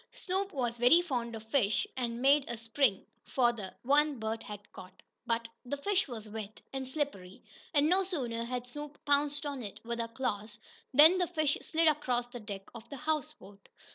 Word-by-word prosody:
Snoop 385 +1 -2
was 240 -4 -2
very 245 +8 +7
fond 240 -8 -2
of 220 - -7
fish, 220 -3 +2
and 240 -1 -3
made 280 +1 +6
a 235 - -4
spring 225 -1 +1 0.2
for 240 -2 +2
the 205 -5 -7
one 290 +2 +3
Bert 220 0 -3
had 210 -1 -9
caught. 185 0 -13 0.2
But 230 0 0 0.2
the 270 +3 -3
fish 390 +6 +1
was 225 -4 -7
wet 215 -1 -7
and 265 -1 -3
slippery, 260 -10 -4 0.3
and 295 -2 +4
no 370 +4 +4
sooner 250 -11 -2
had 250 0 -3
Snoop 295 +3 -8
pounced 290 0 +2
on 280 -3 -3
it 205 -4 -7
with 235 0 -3
her 230 - -1
claws 215 -3 -3 0.3
than 315 +7 +8
the 360 - +2
fish 310 -4 +1
slid 325 +1 +1
across 255 -5 +2
the 245 0 -9
deck 200 -3 -7
of 235 -2 -11
the 280 - -7
houseboat. 255 -10 -4
250 Hz, 190 wpm, -32 LUFS, 225-295 Hz, 0.3 s, than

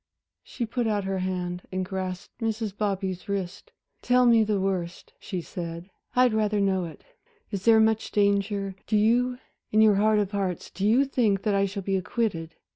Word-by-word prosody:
She 240 - -5
put 235 +1 -2
out 205 -2 0
her 190 0 -2
hand 180 -1 -3
and 185 0 -2
grasped 185 0 -5
Mrs. 220 -2 -2
Bobby's 195 -3 -2
wrist. 195 -1 -4 0.3
"Tell 250 0 +4
me 230 -2 +6
the 210 -2 0
worst," 185 -3 -3
she 185 -4 -4
said. 170 +2 -7 0.2
"I'd 250 -2 +4
rather 210 -1 +1
know 190 -2 +1
it. 165 - -10 0.5
Is 195 -2 -4
there 225 -1 +7
much 220 0 +2
danger, 200 -1 +1
do 215 - +2
you 245 +4 +2 0.3
in 215 - +3
your 215 -2 +6
heart 215 +1 +3
of 205 -2 0
hearts, 195 -4 -3
do 195 +3 -1
you 250 +6 +4
think 220 -7 +1
that 210 - +1
I 200 0 +3
shall 195 0 -5
be 195 +1 0
acquitted?" 185 -5 -2
200 Hz, 185 wpm, -26 LUFS, 185-220 Hz, 0.5 s, there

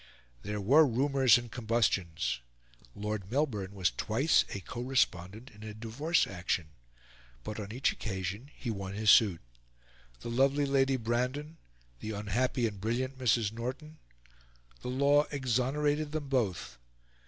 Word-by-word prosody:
There 105 +6 -4
were 135 +11 +6
rumours 130 -1 +4
and 120 -1 -7
combustions. 95 - 0 0.6
Lord 105 -2 -4
Melbourne 110 -8 -1
was 95 -3 +1
twice 135 +9 +2
a 100 - -4
co 120 +6 -7
respondent 110 -3 -1
in 105 - -16
a 105 -1 -7
divorce 125 +10 0
action; 85 -3 -2 0.7
but 105 0 -5
on 105 -1 -6
each 125 +4 +1
occasion 100 +5 -5
he 120 - -4
won 100 -2 -5
his 105 0 +5
suit. 100 -7 +5 0.8
The 120 - -5
lovely 135 +4 +3
Lady 135 -1 +2
Brandon, 125 +7 -2 0.4
the 110 - -5
unhappy 115 +5 0
and 100 -4 -4
brilliant 130 +5 -2
Mrs. 115 -4 +2
Norton... 130 +7 -6 0.8
the - - -6
law 140 +3 +3
exonerated 145 +3 0
them 150 -3 -3
both. 95 - -1
120 Hz, 135 wpm, -31 LUFS, 105-135 Hz, 0.8 s, were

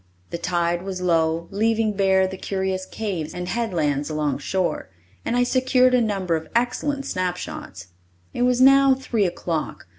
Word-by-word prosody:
The 170 - -4
tide 175 -1 0
was 190 0 -5
low, 165 -2 +1
leaving 220 +1 +1
bare 190 -1 +3
the 190 0 -4
curious 190 0 -3
caves 185 -8 -4
and 180 0 -4
headlands 160 -10 -1
along 150 -3 -1
shore, 180 - -2 0.3
and 235 - -1
I 245 - +4
secured 255 0 +3
a 250 - +4
number 195 -6 0
of 160 0 -4
excellent 270 +4 0
snapshots. 175 - -4 0.4
It - - -3
was 250 0 +3
now 275 0 +6
three 230 -6 0
o'clock. 170 -2 -4
190 Hz, 155 wpm, -23 LUFS, 170-235 Hz, 0.4 s, now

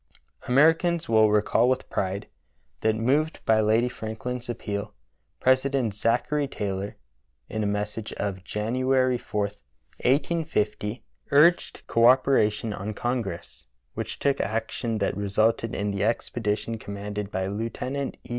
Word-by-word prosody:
Americans 165 +5 +3
will 110 -1 +5
recall 105 +3 +3
with 130 0 0
pride 95 +1 -2 0.5
that, 110 0 +2
moved 140 +8 +1
by 110 -1 +4
Lady 110 +3 +3
FrankUn's 120 +2 -5
appeal, 100 -4 -4 0.4
President 130 -3 +2
Zachary 125 +7 +1
Taylor, 100 -4 -4 0.5
in 110 - -3
a 105 - 0
mes 105 +1 -1
sage 110 0 -6
of 95 -2 -3
January 130 +5 +1
4, 105 -2 -3 0.6
1850, 125 -7 0 0.3
urged 160 +5 +4
co 115 0 +4
operation 115 -5 +3
on 105 +2 -5
Congress, 115 - -4 0.3
which - - -5
took 140 -1 +1
action 115 +1 -2
that 100 - 0
resulted 110 +3 +1
in 100 0 -1
the 100 0 -1
expedition 110 0 -1
com 100 - -7
manded 105 0 -4
by 95 -2 -2
Lieutenant 115 +7 -3
E. - - -16
115 Hz, 130 wpm, -26 LUFS, 105-130 Hz, 0.6 s, will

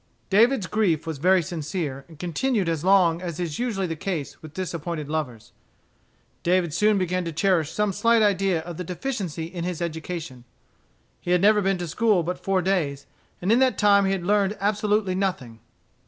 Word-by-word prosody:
David's 230 +2 +4
grief 180 -6 0
was 160 -4 -5
very 185 +3 +4
sincere, 155 -4 -4
and 160 - -15
continued 185 - -1
as 165 -2 -1
long 180 -3 +4
as 175 -2 -5
is 165 -4 -3
usually 225 -6 -1
the 165 -2 -3
case 160 -3 -4
with 155 -1 -12
disappointed 170 -4 -4
lovers. 145 -8 -4 0.9
David 175 -2 +1
soon 210 +3 +3
began 185 -1 -1
to 165 - -4
cherish 165 -1 +1
some 210 -2 0
slight 230 +3 +3
idea 195 -4 +2
of 170 0 -8
the 180 - -4
deficiency 180 - -4
in 170 0 -6
his 180 -2 -3
education. 160 -5 -5 0.8
He - - -8
had 180 0 +4
never 210 +1 +5
been 195 -1 +1
to 175 -1 -4
school 195 +2 +2
but 180 +2 -4
four 190 -1 +1
days; 150 -7 -1 0.4
and 190 - +2
in 235 - +5
that 260 -5 +2
time 200 -1 +4
he 195 - +1
had 190 -3 -2
learned 205 +1 +2
absolutely 205 -1 +1
nothing. 185 - -3
180 Hz, 185 wpm, -24 LUFS, 165-200 Hz, 0.9 s, never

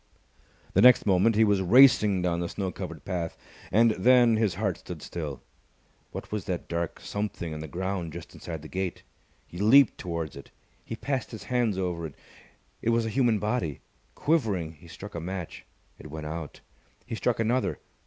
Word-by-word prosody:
The - - +4
next 125 0 +7
moment 100 +3 +4
he 110 - +5
was 100 -3 +3
racing 105 -3 +6
down 85 -1 0
the 85 - -2
snow 95 -2 -3
covered 85 -5 -7
path. 85 -3 -3 0.3
And 115 +2 +5
then 120 +3 +5
his 110 -5 +1
heart 95 -3 -1
stood 90 -3 -8
still. 75 -6 -5 0.7
What - - -7
was 105 -3 -3
that 90 -2 -3
dark 85 -1 -3
something 100 -6 -4
on 75 - -6
the 80 - -6
ground 90 -1 -3
just 85 0 -9
inside 80 -3 -7
the - - -8
gate? 95 +1 -4 0.4
He 85 - -9
leaped 115 +4 +6
towards 85 -3 -4
it. 70 - -11 0.3
He 115 - -6
passed 135 +2 -2
his 110 -4 -8
hands 115 -2 0
over 90 -3 -2
it. 75 - -14 0.7
It - - 0
was 115 0 +2
a - - -1
human 120 -4 +3
body. 105 - -2 0.3
Quivering, 110 - +1
he 80 +2 -17
struck 100 +5 -10
a 85 - -4
match. 90 0 -6 0.3
It 75 - -10
went 75 +1 -6
out. 80 0 -6 0.4
He - - -7
struck 115 +1 0
another. 120 +3 +1
95 Hz, 185 wpm, -27 LUFS, 85-110 Hz, 0.7 s, next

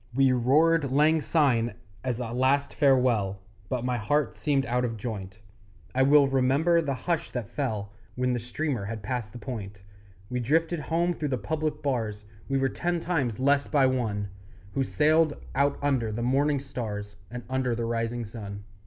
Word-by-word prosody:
We 135 -1 +5
roared 145 +5 +3
Lang 155 +3 +4
Syne 125 -9 +2 0.3
as 125 -2 -2
a 115 -2 -4
last 130 +3 +2
farewell, 125 -8 +3 0.3
But 125 -2 -2
my 125 -1 0
heart 145 +7 0
seemed 140 -3 +1
out 125 +1 0
of 115 -2 -2
joint; 100 -3 -6 0.6
I 130 - +2
well 140 +2 +6
remember 135 +6 +3
the 140 -4 -2
hush 170 +4 -2
that 120 -5 -3
fell 110 -6 -3 0.2
When 125 0 +1
the 120 - -1
steamer 120 -1 -3
had 110 0 -5
passed 120 -2 -3
the - - -9
point 100 -4 -7 0.5
We 125 +4 -2
drifted 165 +7 +1
home 170 +4 0
through 155 -2 -3
the 130 - 0
public 155 +1 -2
bars, 110 -7 -2 0.2
We 135 - +1
were 135 0 +2
ten 175 +5 -1
times 145 -10 -1
less 140 +1 +3
by 140 -3 +3
one 110 -6 0 0.4
Who 135 - +1
sailed 155 +2 +3 0.2
out 140 +1 +2
under 130 -6 +1
the 115 +2 -3
morning 140 +3 +2
stars, 105 -6 -5
And 120 +1 -7
under 130 -2 0
the 115 0 -2
rising 115 0 -2
sun. 100 -2 -8
130 Hz, 175 wpm, -27 LUFS, 115-145 Hz, 0.6 s, well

